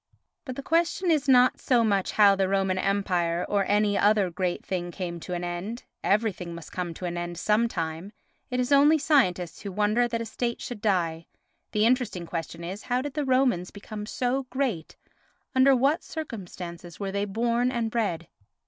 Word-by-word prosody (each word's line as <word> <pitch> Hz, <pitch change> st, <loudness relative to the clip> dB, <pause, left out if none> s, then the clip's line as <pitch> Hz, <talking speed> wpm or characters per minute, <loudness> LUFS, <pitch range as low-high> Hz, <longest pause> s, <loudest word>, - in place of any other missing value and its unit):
But 255 Hz, -3 st, -5 dB
the 275 Hz, -, -6 dB
question 340 Hz, +3 st, +1 dB
is 290 Hz, -3 st, +1 dB
not 250 Hz, -1 st, +5 dB
so 245 Hz, -3 st, +3 dB
much 200 Hz, -4 st, +1 dB
how 200 Hz, -2 st, +6 dB
the 190 Hz, -1 st, +1 dB
Roman 195 Hz, -1 st, +1 dB
Empire 180 Hz, -4 st, 0 dB
or 200 Hz, -1 st, +1 dB
any 205 Hz, 0 st, +2 dB
other 205 Hz, -3 st, +3 dB
great 180 Hz, 0 st, -2 dB
thing 175 Hz, -2 st, -3 dB
came 175 Hz, -1 st, -5 dB
to 180 Hz, +2 st, -5 dB
an 175 Hz, -, -4 dB
end—everything 190 Hz, 0 st, -2 dB
must 170 Hz, -2 st, -10 dB
come 180 Hz, -2 st, -3 dB
to 180 Hz, -, -6 dB
an 175 Hz, 0 st, -3 dB
end 175 Hz, 0 st, -4 dB
some 215 Hz, +5 st, +2 dB
time, 165 Hz, -1 st, -4 dB, 0.4 s
it 250 Hz, -, -1 dB
is 250 Hz, +2 st, -1 dB
only 290 Hz, +3 st, +6 dB
scientists 210 Hz, -, +1 dB
who 200 Hz, -, -5 dB
wonder 210 Hz, +5 st, +2 dB
that 230 Hz, -1 st, -2 dB
a 230 Hz, -, -3 dB
state 235 Hz, +2 st, -3 dB
should 240 Hz, -4 st, -6 dB
die—the 180 Hz, +2 st, -2 dB
interesting 235 Hz, -8 st, +1 dB
question 165 Hz, 0 st, -5 dB
is 190 Hz, +5 st, -5 dB
how 250 Hz, +1 st, 0 dB
did 290 Hz, -1 st, -5 dB
the 295 Hz, -2 st, -1 dB
Romans 255 Hz, -9 st, +2 dB
become 210 Hz, +1 st, -8 dB
so 255 Hz, +3 st, -1 dB
great, 245 Hz, -, -2 dB, 0.6 s
under 265 Hz, 0 st, +5 dB
what 275 Hz, +6 st, +2 dB
circumstances 180 Hz, -, -7 dB
were 195 Hz, -1 st, -3 dB
they 200 Hz, +1 st, -1 dB
born 235 Hz, +4 st, 0 dB
and 235 Hz, -3 st, -1 dB
bred? 190 Hz, -8 st, -1 dB
205 Hz, 180 wpm, -26 LUFS, 180-245 Hz, 0.6 s, how